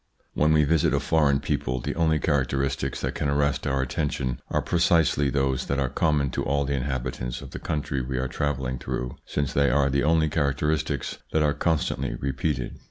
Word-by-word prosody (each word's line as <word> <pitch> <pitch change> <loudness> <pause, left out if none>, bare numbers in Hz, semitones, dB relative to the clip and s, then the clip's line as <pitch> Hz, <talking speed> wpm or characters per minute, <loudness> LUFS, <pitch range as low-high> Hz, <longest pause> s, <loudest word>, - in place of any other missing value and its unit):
When 75 +1 +3
we 75 -1 +5
visit 75 -2 +2
a - - +2
foreign 75 -2 +2
people 65 +1 -1
the - - -3
only 80 -2 +2
charac 70 -5 +1
teristics 70 0 -2
that - - -2
can 70 - -1
arrest 70 0 +1
our 70 -1 +1
attention 65 -1 -2
are - - +1
precisely 80 -4 +3
those 65 -2 0
that 70 - 0
are 65 -2 0
common 70 -1 +1
to - - -2
all 70 +1 0
the 70 - -1
inhabitants 65 -2 -3
of 70 -2 -10
the - - -6
country 70 -3 -2
we 65 +1 -3
are 65 +1 0
travelling 65 -2 -2
through, 60 -1 -4
since 70 -2 -2
they 70 -1 +3
are 70 +1 +2
the 70 +1 +2
only 80 +1 +3
characteristics 75 0 -1
that 80 - +3
are 75 -1 +2
constantly 70 -4 -1
repeated. 70 -1 -2
70 Hz, 195 wpm, -25 LUFS, 65-75 Hz, -, we